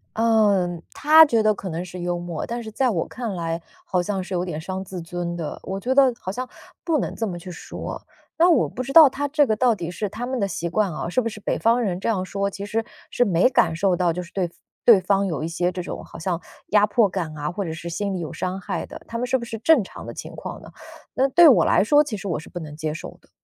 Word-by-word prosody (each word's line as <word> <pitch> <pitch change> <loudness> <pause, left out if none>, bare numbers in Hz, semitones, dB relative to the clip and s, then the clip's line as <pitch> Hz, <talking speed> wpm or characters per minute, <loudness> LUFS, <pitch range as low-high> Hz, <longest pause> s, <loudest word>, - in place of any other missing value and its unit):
呃， 205 -6 +2
他 315 +2 +7
觉 235 -7 +2
得 215 0 +3
可 195 - -6
能 170 +1 -3
是 180 0 -8
幽 175 0 -2
默， 175 -2 -4
但 235 +1 -4
是 220 -1 -8
在 255 +3 +1
我 175 -7 -1
看 235 -5 -5
来， 165 -1 -3 0.2
好 180 - 0
像 190 0 -2
是 190 - -7
有 175 +1 -1
点 160 -3 -5
伤 190 +2 -4
自 185 -1 -7
尊 170 +1 -4
的。 165 -3 -5
我 195 +1 -4
觉 255 +6 0
得 270 -3 +6
好 185 - -4
像 255 +5 -4 0.4
不 325 -4 +1
能 - - -3
这 225 - -2
么 175 -4 -4
去 180 - -10
说， 175 - -7 0.4
那 340 - +5
我 330 -8 +4
不 255 - -5
知 275 +2 -6
道 315 -4 +10
他 285 +2 -3
这 290 0 +3
个 215 - +2
到 245 -1 +3
底 175 -4 -5
是 195 +4 -3
他 240 +4 -5
们 260 -1 -2
的 200 - +1
习 170 -2 -3
惯 195 -1 0
啊， 160 - -4
是 215 - +1
不 230 - 0
是 210 -1 -6
北 - - -1
方 230 +2 +3
人 185 -5 -1
这 - - -3
样 200 -5 +1
说， 195 +2 -2
其 200 0 -7
实， 225 +2 -2 0.2
是 245 - +2
没 185 +3 +3
感 165 -9 +2
受 185 +1 +2
到 175 -2 +1
就 180 - -4
是 170 - -11
对 180 -3 -1 0.3
对 220 -6 +7
方 195 +1 +2
有 160 -7 -2
一 - - -1
些 175 +2 -1
这 180 0 -4
种 - - -6
好 - - -11
像 170 0 -2 0.3
压 210 0 +4
迫 210 -1 +3
感 170 -5 -4
啊， 150 +2 -3
或 195 +1 -3
者 160 - -4
是 170 +2 -7
心 200 +3 -2
理 185 - -3
有 165 -1 -5
伤 185 +3 -3
害 185 -2 -3
的， - - -10
他 230 - -5
们 245 - -1
是 255 +1 +1
不 - - -7
是 230 -1 -5
正 250 0 +4
常 - - -10
的 - - -7
情 - - -8
况 - - -7
呢？ - - -12 0.5
那 265 +1 +3
对 330 +3 +8
我 255 - +5
来 - - +4
说 290 +7 +5
其 250 -8 -5
实 195 - -7
我 160 -4 -1
是 - - -12
不 175 - -6
能 150 -2 -8
接 155 -1 -2
受 - - -8
的。 - - -29
195 Hz, 300 characters per minute, -23 LUFS, 175-235 Hz, 0.5 s, 道